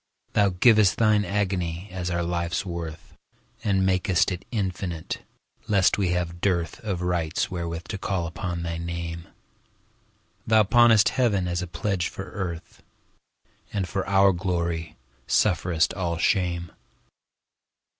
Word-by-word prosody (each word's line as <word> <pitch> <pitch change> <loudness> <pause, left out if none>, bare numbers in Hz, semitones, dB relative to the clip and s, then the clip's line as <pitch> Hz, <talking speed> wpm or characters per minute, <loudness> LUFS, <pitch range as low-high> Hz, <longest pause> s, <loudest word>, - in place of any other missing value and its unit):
Thou 100 -1 +4
giv'st 105 +1 +5
Thine 110 -2 +3
agony 95 -2 -2
as 90 -1 -3
our 85 0 -1
life's 85 +1 -1
worth, 85 -3 -7 0.5
And 95 -2 +2
mak'st 95 0 +2
it 90 0 -5
infinite, 95 -6 -3 0.5
lest 100 -1 +3
we 95 - +2
have 85 -1 -2
dearthOf 90 +1 -1
rights 85 -2 -1
wherewith 85 -2 -4
to 100 - -4
call 95 -3 -1
upon 85 +1 -4
thy 85 -1 -3
Name; 85 0 -5 1.2
Thou 110 -1 +5
pawnest 115 0 +5
Heaven 105 -8 +1
as 85 0 -1
a 90 - -4
pledge 90 +1 -1
for 100 - -8
Earth, 85 -4 -6 0.9
And 95 -3 -2
for 95 +1 -2
our 100 0 +5
glory 85 -4 -2 0.3
sufferest 85 -3 +2
all 85 -3 -2
shame. 85 -1 0
90 Hz, 125 wpm, -25 LUFS, 85-100 Hz, 1.2 s, giv'st